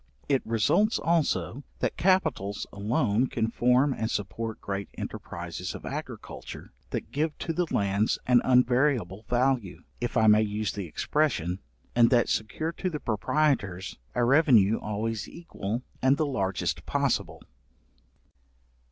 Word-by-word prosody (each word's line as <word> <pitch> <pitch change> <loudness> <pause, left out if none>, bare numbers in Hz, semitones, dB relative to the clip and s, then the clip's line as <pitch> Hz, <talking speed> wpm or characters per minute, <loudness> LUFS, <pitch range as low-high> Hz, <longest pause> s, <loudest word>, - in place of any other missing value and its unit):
It 135 -2 +2
results 115 - +2
also, 155 -5 0
that - - -1
capitals 175 - +1
alone 105 +3 +1
can 115 -2 -1
form 125 +4 +3
and 110 -3 -2
support 110 +3 -3
great 100 0 -4
enterprizes - - -6
of - - -9
agriculture, - - -7 0.2
that - - -4
give 150 +2 -1
to 165 - -3
the 175 +1 0
lands 100 +2 +1
an 125 -1 +5
unvariable 125 -5 +2
value, 125 -6 0 0.2
if 120 0 -2
I 110 - +4
may 105 0 +6
use 105 -1 -1
the 100 -3 -5
expression, 95 - 0 0.4
and 120 -1 +6
that 120 -2 +3
secure 155 +9 -1
to 185 +2 -3
the 155 -4 -4
proprietors 105 - 0 0.2
a 125 - +2
revenue 120 -6 +5
always 110 +1 -3
equal, 120 - -5 0.2
and 135 +2 +4
the 155 - +1
largest 100 - -2
possible. - - -1
120 Hz, 135 wpm, -27 LUFS, 105-140 Hz, 0.4 s, may